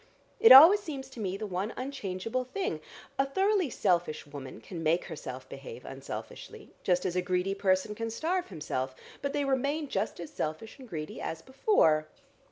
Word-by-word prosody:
It 455 - +8
always 325 +10 +11
seems 280 -9 -7
to 245 - -10
me 195 -2 -2
the 215 - -4
one 195 +2 -3
unchangeable 250 -2 -3
thing. 375 - -3 0.4
A 270 - +4
thoroughly 385 +2 +2
selfish 175 -8 0
woman 140 -2 -9
can 175 -4 -8
make 165 +2 +1
herself - - -7
behave 475 -2 -9
unselfishly, - - -8
just 180 -1 +1
as 180 -1 -1
a 180 - +2
greedy 180 +1 0
person 195 +1 +1
can 230 +2 -4
starve 345 +10 -1
himself, 135 -7 -3 0.3
but 280 - -1
they 285 0 0
remain 280 +3 0
just 200 -4 -2
as 170 -3 -7
selfish 160 - -5
and 255 -3 -12
greedy 155 -4 -6
as 160 0 -5
before. 210 - +3
215 Hz, 175 wpm, -30 LUFS, 180-280 Hz, 0.4 s, always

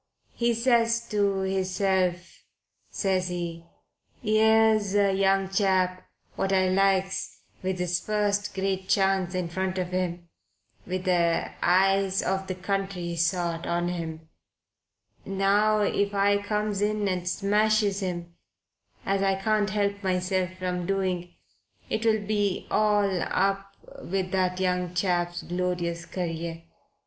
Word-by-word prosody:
He 235 0 +1
says 235 -1 +2
to 200 -2 +1
hisself, 190 -1 -1 0.5
says 190 -2 0
he, 170 -2 -5 0.6
'ere's 215 -1 +4
a 200 -1 +3
young 195 0 +2
chap 185 -2 +1 0.3
what 195 - -1
I 185 -1 +3
likes 195 0 +1 0.2
with 185 0 -2
his 180 -1 0
first 205 0 -1
great 190 -1 -2
chance 190 -2 +2
in 180 -2 -1
front 190 +2 -2
of 180 -1 -2
him, 175 -1 -3 0.6
with 185 0 -3
the 170 -3 +1
eyes 195 +1 +3
of 190 0 -1
the 185 - -3
country 190 -2 -3
sot 170 0 0
on 175 0 0
him 165 -2 -5 1.0
now 200 +2 +2
if 200 0 0
I 200 +1 +3
comes 210 -1 -1
in 210 0 0
and 180 -1 -1
smashes 210 +1 +2
him, 175 -3 -4 0.7
as 195 0 +1
I 195 -1 +2
can't 210 +1 +1
help 200 0 -1
myself 185 0 0
from 180 -1 -3
doing, 185 -3 -2 0.6
it'll 220 -1 +1
be 205 -2 0
all 210 -1 +3
u - - -2
p 195 +1 -2
with 185 0 -2
that 185 -1 0
young 180 -1 -1
chap's 175 -1 0
glorious 175 -1 -2
career. 165 -2 -4
190 Hz, 125 wpm, -26 LUFS, 180-200 Hz, 1.0 s, ere's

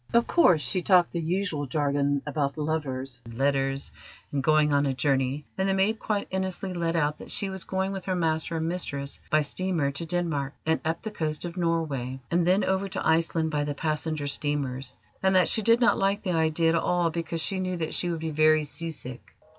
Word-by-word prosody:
Of 235 0 +5
course, 180 - +4
she 185 - 0
talked 180 -1 +4
the 170 - -2
usual 165 -3 -1
jargon 145 0 0
about 145 -1 -1
lovers 135 -5 -3
and 115 0 -10
letters 135 0 0 0.4
and 140 - 0
going 155 0 +3
on 140 0 +3
a 135 - -1
journey, 135 +1 0
and 190 0 +2
the 190 - +2
maid 210 +3 +2
quite 210 -2 -1
innocently 190 0 -3
let 165 0 0
out 150 -2 +1
that - - -10
she 195 -1 -1
was 190 -2 -4
going 190 0 -1
with 195 -2 -5
her 185 - 0
master 165 -1 0
and 160 0 -1
mistress 140 -5 -3
by 155 - +4
steamer 160 -1 -1
to 140 +4 -4
Denmark 160 -5 -1
and 160 0 +1
up 160 +1 -2
the 220 - -4
coast 155 -5 -3
of 170 0 -6
Norway, 155 -7 -1
and 170 0 +2
then 190 +3 +4
over 190 +1 0
to - - -2
Iceland 160 0 +2
by 145 -1 0
the 145 0 -3
passenger 155 0 -2
steamers, 140 -2 -2 0.2
and 190 0 +3
that 185 -2 +5
she 220 - +1
did 230 +2 +4
not 240 - +4
like 195 +1 +1
the 185 - -1
idea 160 0 +2
at 165 - +2
all, 170 0 +1
because 165 0 -3
she 190 +6 -1
knew 185 -1 -2
that 160 -2 -3
she 175 - -1
would 165 -2 -3
be 160 0 -2
very 155 0 +4
seasick." 145 -5 -6
160 Hz, 215 wpm, -27 LUFS, 145-180 Hz, 0.4 s, Of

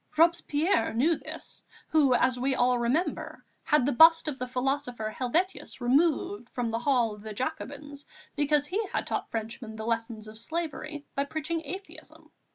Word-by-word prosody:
Robespierre 325 - +2
knew 310 +8 +3
this, - - -9 0.3
who, 280 -5 +4
as 250 +1 +2
we 265 +1 +1
all 245 0 +3
remember, 255 +10 -1 0.2
had 300 -5 +3
the 285 - +2
bust 325 +5 +7
of 285 -3 -3
the 255 - -3
philosopher 250 -3 -2
Helvétius 330 +10 -1
removed 250 -4 +1
from 240 -2 -2
the 230 - -1
Hall 240 -4 +2
of 210 - -12
the 215 0 -7
Jacobins, 285 +1 -5 0.3
because 290 -1 +2
he 395 +9 -1
had - - -2
taught - - -3
Frenchmen 225 0 -5
the 220 0 -6
lessons 230 -1 -2
of 215 0 -10
slavery 305 +1 -4
by 280 - 0
preaching 315 +3 -2
atheism.... 375 +7 -9
270 Hz, 165 wpm, -28 LUFS, 235-310 Hz, 0.3 s, bust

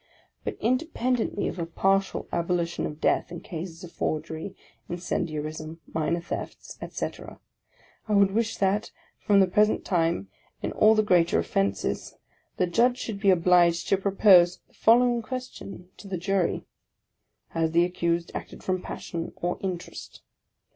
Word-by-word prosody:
But - - -4
in 250 +3 +3
dependently 250 -8 -1
of - - -5
a 165 - -2
partial 195 +3 +1
abolition 170 0 0
of 150 - -8
death - - +1
in 175 - -6
cases 165 0 -7
of 175 - -9
forgery, 160 +4 -3 0.3
incendiarism, 155 -2 -4
minor 160 +2 0
thefts, 170 - -7
efc - - -4
camera, - - -12 0.7
I 215 - 0
would 200 -1 +5
wish 225 +2 0
that, 200 +2 +1 0.3
from 205 -1 +4
the - - +6
present 210 +3 +2
time, 165 - +1 0.4
in - - -1
all 215 +1 +5
the 215 - +3
greater 175 -4 +3
offences, 100 -1 -1 0.4
the 180 - +3
Judge 235 +8 +2
should 220 -5 -5
be 200 -1 +3
obliged 175 -1 +4
to 195 - +4
propose 190 -2 +5
the - - -31
following 240 +1 +4
question 225 -7 -7
to 200 - -11
the 190 -2 -3
Jury: 190 0 0 0.8
"Has 165 -1 0
the 170 +2 +4
accused 170 -1 -1
acted - - -7
from 185 -1 -1
Passion, 170 -2 -6
or 175 0 -2
Interest?" 185 -3 -6
180 Hz, 150 wpm, -26 LUFS, 170-205 Hz, 0.8 s, the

